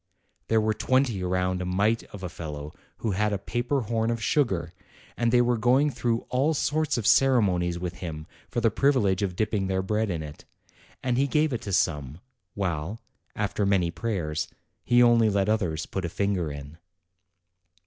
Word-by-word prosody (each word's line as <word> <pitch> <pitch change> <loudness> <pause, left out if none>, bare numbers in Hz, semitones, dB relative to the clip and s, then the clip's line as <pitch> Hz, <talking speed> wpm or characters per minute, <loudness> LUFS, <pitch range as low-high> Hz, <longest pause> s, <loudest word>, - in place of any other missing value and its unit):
There 110 - +3
were 110 0 +1
twenty 125 -5 +1
round 90 0 0
a - - -3
mite 100 +5 +1
of 100 -2 -11
a - - -2
fellow 75 -3 -7 0.3
who 110 - +1
had 105 +3 +1
a 100 - 0
paper 120 +7 -1
horn 115 0 -1
of 115 0 -1
sugar, 100 - 0 0.4
and 120 -1 +1
they 120 0 +5
were 120 -1 +1
going 130 +6 +3
through 120 -3 -1
all 140 +5 +1
sorts 155 0 0
of 115 - -2
ceremonies 95 -11 +3
with 90 0 -5
him 80 -3 -6 0.2
for 120 - -2
the 115 -1 +3
privilege 105 -8 +2
of 95 -3 -1
dipping 105 -1 0
their 95 0 0
bread 105 +2 0
in 85 -4 -2
it, 75 -1 -10 0.6
and 125 -1 +1
he 140 - +3
gave 150 +1 +1
it 120 - -2
to 100 - -5
some, 75 -4 0 0.4
while, 90 +1 -2 0.4
after 105 0 -1
many 95 -4 +2
prayers, 85 -5 -2 0.4
he 120 0 +5
only 115 -2 +5
let 100 -1 +1
others 90 -8 0
put 95 - -4
a 85 - -2
finger 90 -4 -1
in. 70 +3 -9
100 Hz, 180 wpm, -26 LUFS, 90-120 Hz, 0.6 s, they